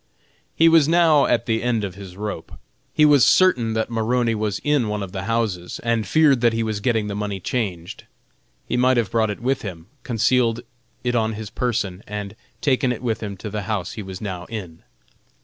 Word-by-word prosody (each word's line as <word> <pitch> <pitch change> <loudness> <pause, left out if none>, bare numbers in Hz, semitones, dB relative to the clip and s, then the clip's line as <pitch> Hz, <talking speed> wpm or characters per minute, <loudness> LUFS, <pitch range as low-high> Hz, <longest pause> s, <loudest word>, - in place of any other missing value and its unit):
He 165 - +5
was 165 -3 +6
now 160 -3 +4
at - - +1
the 110 -2 0
end 120 -3 0
of 95 -2 -4
his 95 -1 -11
rope. 105 -5 -5 0.4
He 150 - +4
was 145 -4 +6
certain 125 -12 +4
Maroney 115 +1 0
was 105 -2 -2
in 145 -6 +2
one 105 -1 -2
of 95 - -7
the 95 -1 -5
houses, 110 -6 -2
and 115 -3 0
feared 140 0 +4
that 120 -1 +3
he 115 0 0
was 110 -2 -2
getting 110 0 0
the 105 - -4
money 105 -1 -3
changed. 90 -5 -4 0.6
He - - -2
might 130 +1 +3
have 115 -5 0
brought 110 -2 +2
it 105 - -4
with 130 +3 0
him, 85 -6 -7 0.2
concealed 120 0 +1 0.4
it 125 -1 0
on 110 -2 +1
his 110 -1 -7
person, 105 -7 -2
and 105 0 -6 0.3
taken 130 -5 +2
it 120 0 -5
with 115 -3 -1
him 100 -3 -5
to 105 +2 -7
the 105 0 -3
house 105 -5 -2
he 115 - -6
was 95 -2 -8
now 90 -4 -5
in. 90 -7 -8
110 Hz, 200 wpm, -22 LUFS, 100-125 Hz, 0.6 s, was